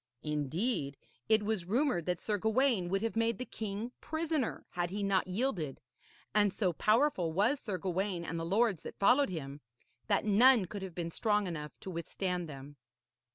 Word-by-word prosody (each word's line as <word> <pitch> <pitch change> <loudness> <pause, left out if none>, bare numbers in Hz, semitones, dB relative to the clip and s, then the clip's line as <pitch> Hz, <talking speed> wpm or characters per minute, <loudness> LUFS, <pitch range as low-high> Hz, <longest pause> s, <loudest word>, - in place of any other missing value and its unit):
Indeed, 150 - -1 0.3
it 220 -1 +4
was 210 -4 -1
rumoured 225 - +1
that 180 -1 0
Sir 210 0 -1
Gawaine 220 -3 +2
would 195 +3 0
have 225 - -1
made 230 0 +1
the 255 - -4
king 220 +2 -5
prisoner 315 -5 -2
had 175 -1 -1
he 200 +2 -3
not 195 -2 +2
yielded; 185 - -1 0.5
and 205 -1 +4
so 185 -3 0
powerful 215 - +2
was 215 - +2
Sir 205 -8 -3
Gawaine 185 0 -2
and 165 0 -3
the - - -3
lords 200 +1 +2
that - - -9
followed 250 +8 +4
him, 145 -5 -6 0.5
that - - +2
none 220 +1 +6
could 200 +3 -7
have 190 -3 -7
been 170 -1 -3
strong 210 +2 +1
enough 150 -4 -6
to 190 - -6
withstand 175 0 -3
them. 140 0 -10
195 Hz, 175 wpm, -32 LUFS, 170-225 Hz, 0.5 s, none